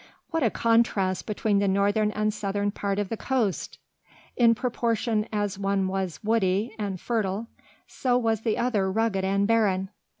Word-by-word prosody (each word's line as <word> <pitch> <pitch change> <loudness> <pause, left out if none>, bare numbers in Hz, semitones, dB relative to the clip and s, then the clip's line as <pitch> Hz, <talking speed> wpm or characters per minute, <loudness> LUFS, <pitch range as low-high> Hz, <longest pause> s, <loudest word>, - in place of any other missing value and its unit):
What 325 -1 0
a 235 - +3
contrast 220 -5 +1
between 210 -1 +1
the 200 - +1
northern 205 +2 +2
and 215 0 -1
southern 205 0 -1
part 200 -1 -2
of 205 -2 -1
the 225 - -3
coast! 235 -8 -1 0.6
In 230 -2 +5
proportion 230 -2 -1
as 205 -2 -2
one 195 -1 0
was 185 -5 -3
woody 210 0 +1
and 200 -3 -3
fertile 215 -1 -1 0.4
so 250 -2 0
was 225 -3 0
the 220 -2 0
other 210 -6 +1
rugged 215 -2 0
and 200 +1 +1
barren! 200 -4 +2
210 Hz, 160 wpm, -26 LUFS, 195-230 Hz, 0.6 s, In